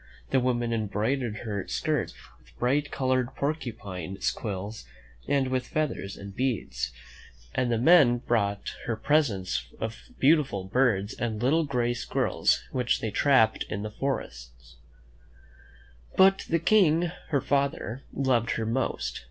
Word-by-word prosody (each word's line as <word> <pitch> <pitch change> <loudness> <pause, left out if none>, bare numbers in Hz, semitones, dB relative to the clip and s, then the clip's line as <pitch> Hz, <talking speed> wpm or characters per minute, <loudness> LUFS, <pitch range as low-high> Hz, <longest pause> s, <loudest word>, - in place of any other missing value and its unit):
The 135 - +4
women 120 -2 0
embroidered 110 +2 -1
her 100 -3 -3
skirts - - -1 0.2
with - - -24
bright 145 +4 +1
colored 130 -1 0
porcupine 110 - -4 0.2
quills, 105 0 -5 0.4
and 135 -2 +2
with 130 -1 -1
feathers 140 -10 -2
and 100 -1 -9
beads, 125 -3 -2 0.6
and 125 -1 0
the 115 - +2
men 130 -2 +6
brought 100 -5 -1
her 115 - 0
presents 105 - +1
of 115 0 -4 0.2
beautiful 135 - +3
birds 100 -1 +1
and 110 -3 -3
little 150 +7 +2
gray 120 -4 0
squir 120 - -1
rels - - +2
which 125 -2 +1
they 110 - -3
trapped 110 -1 +3
in 100 - -3
the 105 - -5
forest. - - -5 1.4
But 195 +1 +5
the 165 - +3
King, 170 -2 +3 0.2
her 145 -3 +1
father, 140 -3 -1
loved 125 -4 +1
her 110 - -1
most. 110 - -2
120 Hz, 135 wpm, -27 LUFS, 105-140 Hz, 1.4 s, men